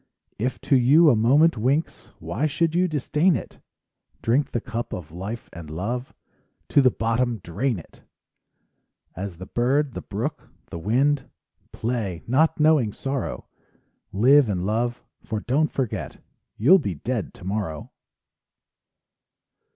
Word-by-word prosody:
If 125 +4 -2
to 140 - +2
you 145 +6 +6
a - - +3
moment 135 +6 +4
winks— 140 +8 -1
Why 155 - -2
should 155 +2 0
you 180 +2 +2
disdain 155 +3 +1
it? - - -7 0.6
Drink 130 +4 +2
the 120 - -1
cup 120 +1 -5
of 80 -4 -7
life 100 +7 -6
and 85 -3 -9
love, 115 - -4 0.6
To 140 - +5
the 130 - +5
bottom 115 +1 0
drain 105 +7 -2
it! 85 - -13 1.1
As 95 -1 -6
the 95 - -8
bird, 130 +5 +1
the - - -5
brook, - - -5 0.2
the 85 - -5
wind, 135 - +1 0.4
Play, 110 -7 -3
not 155 +7 +2
knowing 150 -8 +4
sorrow; 135 +4 -4 0.7
Live 130 +5 +5
and 90 -2 -1
love, 120 +4 -1 0.2
for 110 -2 -3
don't 140 +8 +1
forget— 105 - -3 0.4
You'll 155 - +6
be 100 - -3
dead 115 - -3
tomorrow! 95 -5 -4
120 Hz, 135 wpm, -24 LUFS, 105-140 Hz, 1.1 s, you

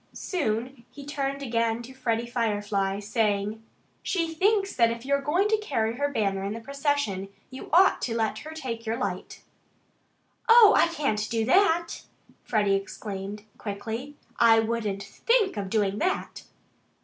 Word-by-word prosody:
Soon 250 - -3
he 275 +3 -11
turned 275 -1 -3
again 230 -2 0
to 255 +3 -11
Freddie 235 -3 -1
Firefly, 205 -4 -1
saying, 210 0 -1 0.4
"She 335 -3 -1
thinks 395 +3 +1
that 230 -2 +4
if 230 +1 -5
you're 280 0 +1
going 345 +9 +1
to 435 - +3
carry 235 - -1
her 285 +1 0
banner 200 -7 -1
in 200 +1 -3
the 225 - -6
procession 275 -7 -2 0.2
you 260 - -9
ought 360 +5 +5
to 230 - -2
let 220 -1 -1
her 310 - -9
take 260 -8 -5
your 225 0 -2
light." 190 -6 -5 1.1
"Oh, 450 -3 +9
I - - +5
can't 280 -10 -1
do 225 -1 0
that!" 340 - +2 0.4
Freddie 205 -3 +1
exclaimed 195 +1 -4 0.2
quickly. 225 +7 -5 0.2
"I 225 -1 +6
wouldn't 220 -3 -2
THINK 425 - +1
of 200 -2 -4
doing 205 -1 0
that!" 370 +3 -2
230 Hz, 150 wpm, -26 LUFS, 210-285 Hz, 1.1 s, Oh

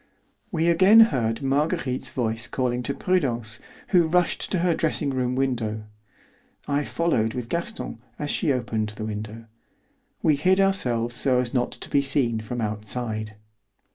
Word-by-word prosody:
We 165 -3 +1
again 190 +6 +7
heard 115 0 -1
Marguerite's 135 -2 0
voice 115 -2 -2
calling 125 -1 -1
to 140 +3 -3
Prudence, 120 -11 0 0.3
who 175 -4 +4
rushed 180 +1 +1
to 190 - +1
her 175 - +3
dressing 155 -3 +1
room 125 -1 -1
window. 120 -5 -1 0.8
I 145 0 0
followed 115 -10 0
with 120 -2 -5
Gaston 170 - -4 0.2
as 150 0 -2
she 160 -7 +1
opened 115 -4 -1
the 105 +1 -6
window. 110 +1 -6 0.8
We 150 -2 +4
hid 185 +6 +3
ourselves 125 -12 +2
so 130 +1 +1
as 125 -1 -1
not 125 -2 +1
to - - -9
be 140 - +2
seen 135 -5 +1
from 115 +2 -5
outside. 110 0 -3
125 Hz, 150 wpm, -24 LUFS, 115-155 Hz, 0.8 s, again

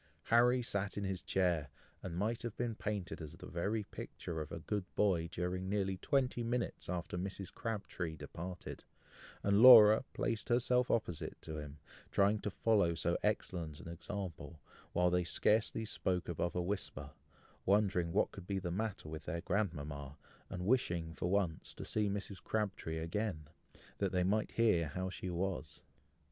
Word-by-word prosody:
Harry 125 +2 +4
sat 100 -3 -2
in 100 - -1
his 95 -2 -2
chair, 85 -6 +1 0.3
and 85 -2 -5
might 110 +5 0
have 120 -3 -5
been 120 -1 -1
painted 105 -5 -3
as 75 -2 -7
the - - -10
very 105 +6 -1
picture 80 -4 -6
of 75 - -7
a - - -4
good 100 +5 -2
boy 90 -5 +2
during 90 +1 -2
nearly 95 -1 0
twenty 130 +2 +1
minutes 120 -4 -2
after 90 0 -3
Mrs. 95 +1 -5
Crabtree 100 -7 -3
departed; 85 +5 -7 0.6
and 100 +1 +4
Laura 110 -3 +10
placed 115 -3 -2
herself 125 +1 +3
opposite 90 -8 -1
to 80 -1 -5
him, 75 0 -8 0.3
trying 100 +2 +3
to 105 - -2
follow 100 -4 +2
so 85 +1 0
excellent 85 -7 -1
an - - -10
example, 85 -2 -6 0.3
while 90 0 +3
they 90 0 +3
scarcely 110 +5 +1
spoke 90 -4 -1
above 85 +1 -2
a 90 - +1
whisper, 100 +2 -4 0.5
wondering 95 -4 +2
what - - +2
could 90 - -10
be 100 - -1
the 90 -2 -2
matter 100 -2 -3
with 80 0 -7
their 85 +1 -3
grandmama, 75 -9 -2 0.3
and 90 -2 -4
wishing 85 -9 +1
for 85 +2 -2
once, 90 -5 0
to - - -6
see 105 -2 +1
Mrs. 100 -1 -4
Crabtree 100 -7 -2
again, 85 -1 -2 0.5
that 100 -2 +1
they 90 -1 +2
might 105 +4 +1
hear 105 -8 +3
how 95 +5 -3
she 95 0 -5
was. 90 -3 -3
95 Hz, 165 wpm, -35 LUFS, 85-105 Hz, 0.6 s, Laura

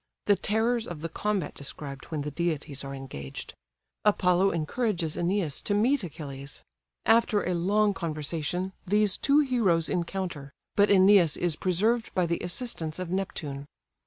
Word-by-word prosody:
The 205 - +5
terrors 225 +3 0
of 165 -4 -7
the 165 - -3
combat 200 -1 -2
described, 140 -1 -7
when 155 -3 -4
the 150 - -4
deities 150 -3 -2
are 135 0 -6
engaged. 70 - -7 0.5
Apollo 190 -2 +3
encourages 170 0 -1
Æneas 175 -4 0
to 205 - +1
meet 245 +4 +2
Achilles. 140 -4 -7 0.4
After 225 -1 +4
a 180 - +1
long 205 +4 +2
conversation, 165 +2 -3
these 210 +1 +3
two 285 +2 +4
heroes 215 - +2
encounter; 175 -5 -3 0.2
but 205 0 +4
Æneas 190 -4 +6
is 175 -3 0
preserved 215 +8 0
by 180 - +3
the 170 0 -1
assistance 175 -4 -3
of 185 -2 -5
Neptune. 145 -7 -3
180 Hz, 145 wpm, -28 LUFS, 155-205 Hz, 0.5 s, Æneas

